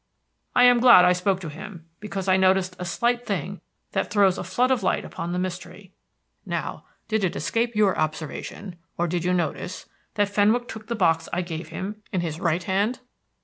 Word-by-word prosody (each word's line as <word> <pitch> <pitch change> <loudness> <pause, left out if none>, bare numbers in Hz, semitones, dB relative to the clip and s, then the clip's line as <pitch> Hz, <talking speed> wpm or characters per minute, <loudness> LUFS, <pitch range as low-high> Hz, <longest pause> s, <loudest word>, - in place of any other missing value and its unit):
I 245 - +6
am 245 -1 +7
glad 235 -7 +8
I 180 - +5
spoke 185 +1 0
to 165 - -5
him, 165 +3 -10
because 200 -2 -5
I 185 - +5
noticed 190 -1 +2
a 180 - -4
slight 240 +7 0
thing - - -3 0.3
that - - -1
throws 200 -3 +3
a - - -3
flood 240 +9 +1
of 255 -4 +2
light 185 - 0
upon 170 - -5
the 180 - -2
mystery. 185 +1 -6 0.5
Now, - - -4 0.2
did 220 -2 0
it 185 - 0
escape 230 +9 -1
your 210 -3 +3
observation, 155 +4 -4 0.2
or 175 - +1
did 175 0 -2
you 180 - +1
notice 180 +1 -2 0.3
that 205 -1 +2
Fenwick 215 +4 +2
took 220 -2 -9
the 235 - -2
box 165 -5 +1
I 180 - -1
gave 165 -1 -6
him 195 +6 -6
in 185 - 0
his 160 -2 -4
right 175 -1 0
hand?" 205 +7 0
185 Hz, 195 wpm, -24 LUFS, 175-210 Hz, 0.5 s, glad